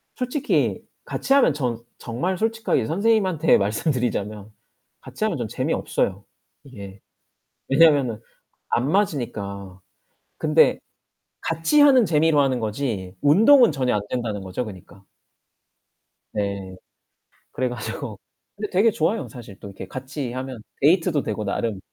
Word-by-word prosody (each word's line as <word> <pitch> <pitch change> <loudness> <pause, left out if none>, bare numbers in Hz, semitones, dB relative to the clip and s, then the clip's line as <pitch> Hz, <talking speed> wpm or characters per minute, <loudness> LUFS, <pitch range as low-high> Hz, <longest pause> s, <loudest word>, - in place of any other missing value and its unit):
솔직히 255 +4 0 0.2
같이 270 - -1
하면 280 - +5
전 120 -5 -2 0.2
정말 155 +11 -3
솔직하게 220 - 0
선생님한테 195 - +2
말씀 105 +10 0
드리자면 110 -5 -3 0.5
같이 - - -7
하면 - - 0
전 - - -3
재미없어요, 100 +1 -2 0.4
이게. 100 -8 -11 0.7
왜냐면은 135 -6 +4 0.5
안 125 +4 +1
맞으니까. 100 - -2 0.6
근데 - - +3 0.6
같이 165 - +1
하는 270 -4 +6
재미로 160 -3 +3
하는 135 -3 +2
거지 105 -4 -3
운동은 225 - +6
전혀 130 -3 0
안된다는 105 0 -3
거죠, 95 +6 -4
그니까. 95 -1 -12 1.3
네. 100 -2 -3 0.8
그래 130 0 -1
가지고 115 -1 -6 0.4
근데 210 0 -5
되게 205 +5 +3
좋아요. 185 +5 -1
사실 115 -7 -12
또 - - -9
이렇게 95 -1 -9
같이 130 +2 -5
하면 130 -2 -6 0.2
데이트도 165 0 +3
되고 105 0 -3
나름. 105 0 -2
130 Hz, 285 characters per minute, -23 LUFS, 105-165 Hz, 1.3 s, 하는